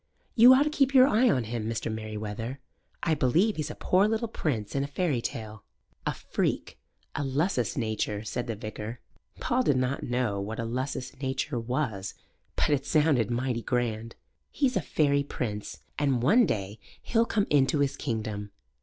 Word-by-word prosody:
You 245 +3 +9
ought 275 - +5
to 300 - -1
keep 275 -3 +2
your 255 -1 +9
eye 250 -1 +4
on 130 - +2
him, 115 0 -3
Mr. 115 -1 -2
Merewether. 110 +3 -5 0.5
I 165 - +2
believe 160 - +2
he's 155 -1 -2
a 150 - -6
poor 190 +3 +3
little 225 +2 0
prince 120 - -2
in 135 - 0
a - - -3
fairy 145 -4 0
tale." 110 -2 -6 0.4
"A - - +1
freak - - -2 0.3
a 145 - -2
lusus 135 - 0
naturae" 110 -1 -2
said 120 +3 -3
the 115 - -2
vicar. 110 +2 -6 0.4
Paul 250 +2 +1
did 145 - +2
not 130 +2 0
know 120 -5 -1
what 110 +3 -5
a 115 - -2
lusus 130 +2 -3
naturae 130 -1 -1
was, 115 -7 -2 0.4
but - - +1
it 140 -1 +1
sounded 145 -7 +3
mighty 120 0 -1
grand. 115 -2 -2 0.3
"He's 270 -3 0
a - - +2
fairy 140 -2 +2
prince, 110 -7 -5 0.2
and 135 -5 +1
one 225 - +5
day 100 +1 -3 0.2
he'll 230 0 +2
come 205 -2 +1
into 145 0 +4
his 140 -1 +1
kingdom." 110 -5 -3
130 Hz, 175 wpm, -28 LUFS, 110-155 Hz, 0.5 s, You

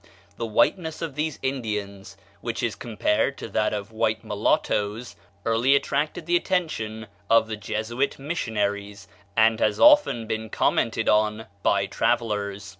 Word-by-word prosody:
The 115 - -3
whiteness 160 - +1
of 160 -4 -4
these 150 +1 -2
Indians, 105 -7 -4 0.2
which 115 +1 -3
is 115 -2 0
compared 105 -2 0
to - - -6
that - - +1
of 105 0 -4
white 110 0 0
mulattoes, 105 +4 -1 0.3
early 115 +5 +3
attracted 150 +4 -1
the 175 +1 +2
attention 110 -13 -1 0.2
of 115 -1 +5
the 110 - -3
Jesuit 110 +5 -2
missionaries, 105 - -3 0.3
and 110 0 +4
has 105 -1 +1
often 295 - +6
been 110 0 -4
commented 115 +1 +1
on 105 +1 +2 0.2
by 100 -1 +2
travellers. 100 -1 -1
110 Hz, 135 wpm, -25 LUFS, 105-135 Hz, 0.3 s, often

